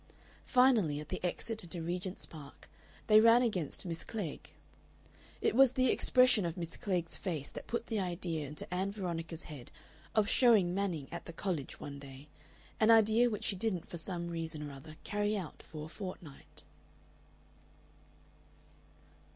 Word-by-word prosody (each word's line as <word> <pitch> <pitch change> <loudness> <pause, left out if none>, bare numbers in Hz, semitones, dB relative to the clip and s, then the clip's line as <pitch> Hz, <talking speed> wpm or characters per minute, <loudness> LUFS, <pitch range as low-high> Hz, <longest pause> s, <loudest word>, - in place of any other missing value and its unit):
Finally, 235 - +4
at 150 - -8
the 185 - -4
exit 220 +5 -2
into 175 0 -6
Regent's 180 +3 -3
Park, 145 -3 -12 0.4
they 215 0 +7
ran 230 +2 +7
against 185 - -2
Miss 165 -2 -3
Klegg. 200 -10 -5 0.9
It - - +2
was 260 0 +6
the 255 -1 +3
expression 255 -5 +4
of 170 0 -3
Miss 170 -2 -3
Klegg's 180 -4 -2
face 160 -7 -4
that - - -8
put 235 0 -2
the 225 -3 -2
idea 170 -4 -2
into 150 +5 -6
Ann 190 +2 0
Veronica's 170 -4 -4
head 145 -6 -9 0.5
of 215 -2 +4
showing 215 -8 +5
Manning 180 -8 -1
at 170 - -6
the 170 - -8
College 165 -6 -3
one 140 -1 -7
day, 140 +1 -11 0.5
an 215 - +4
idea 225 +2 +6
which 210 -3 -4
she 200 - +1
didn't 185 -3 -2
for 175 - -6
some 170 0 -3
reason 160 -3 -4
or 145 - -8
other 155 +3 -11
carry 210 +1 0
out 180 -6 -6
for 155 -1 -8
a - - -8
fortnight. 175 -5 -9
180 Hz, 160 wpm, -33 LUFS, 160-215 Hz, 0.9 s, they